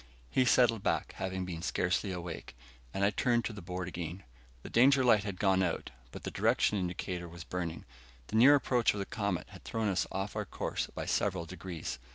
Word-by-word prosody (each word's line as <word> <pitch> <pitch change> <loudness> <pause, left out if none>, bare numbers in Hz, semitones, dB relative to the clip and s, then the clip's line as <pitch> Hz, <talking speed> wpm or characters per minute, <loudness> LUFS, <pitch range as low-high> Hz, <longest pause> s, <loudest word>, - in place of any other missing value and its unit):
He 130 - +3
settled 115 -2 +4
back, - - 0
having 95 -1 -2
been 85 -2 -5
scarcely 90 +2 0
awake, 85 -7 -6 0.4
and 100 +6 +1
I 100 - +3
turned 120 +1 +1
to - - -3
the 105 - -8
board 90 +1 -4
again. 90 +1 -5 0.4
The - - -7
danger 130 +3 +6
light 110 -4 +5
had 100 -3 -4
gone 95 -2 +3
out, 85 -3 -1 0.2
but - - -9
the - - -4
direction 105 - +2
indicator 90 -1 -3
was 85 -1 -9
burning. 85 0 -4 0.4
The 105 - -6
near 130 +6 +8
approach 125 -4 +2
of - - -3
the 100 - -2
comet 100 -7 -2
had - - -13
thrown 110 -2 -1
us 95 -2 +1
off 95 +2 -3
our - - -1
course - - -3
by - - -6
several 95 -4 0
degrees. 85 -6 -6
95 Hz, 205 wpm, -32 LUFS, 90-110 Hz, 0.4 s, near